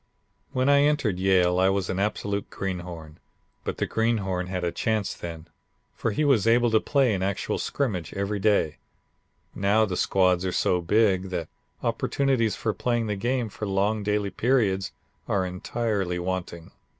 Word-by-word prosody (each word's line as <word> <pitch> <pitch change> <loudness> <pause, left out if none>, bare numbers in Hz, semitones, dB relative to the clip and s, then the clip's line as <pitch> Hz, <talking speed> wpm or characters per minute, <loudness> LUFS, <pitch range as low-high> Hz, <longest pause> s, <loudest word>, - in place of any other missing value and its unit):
"When 130 +1 0
I 140 0 +6
entered 145 -11 +1
Yale 90 -1 +3
I 95 +1 +4
was 95 -1 0
an 95 - -2
absolute 100 -1 -2
greenhorn, 85 -5 -6 0.4
but - - -4
the - - 0
greenhorn 100 -6 0
had 90 -1 -3
a 85 - 0
chance 110 -1 -1
then, 85 -1 -8 0.5
for - - -2
he 150 +8 0
was 120 -7 +3
able 120 0 +4
to 110 - +5
play 135 -4 +2
in 95 - -1
actual 95 0 -1
scrimmage 100 - -2
every 100 +1 -2
day; 100 -7 +2 0.8
now 105 +3 +3
the 95 -4 -3
squads 90 -1 +2
are 95 - -1
so 90 0 +1
big 95 0 +2
that 85 -3 -4 0.3
opportunities 130 -6 +1
for 110 - -1
playing 120 -2 0
the 105 -1 -1
game 120 +3 -1
for 105 0 -6
long 100 +2 +1
daily 105 -1 0
periods 100 -4 +1 0.4
are 95 -2 +1
entirely 95 0 -2
wanting. 90 -2 -4
100 Hz, 160 wpm, -26 LUFS, 90-110 Hz, 0.8 s, I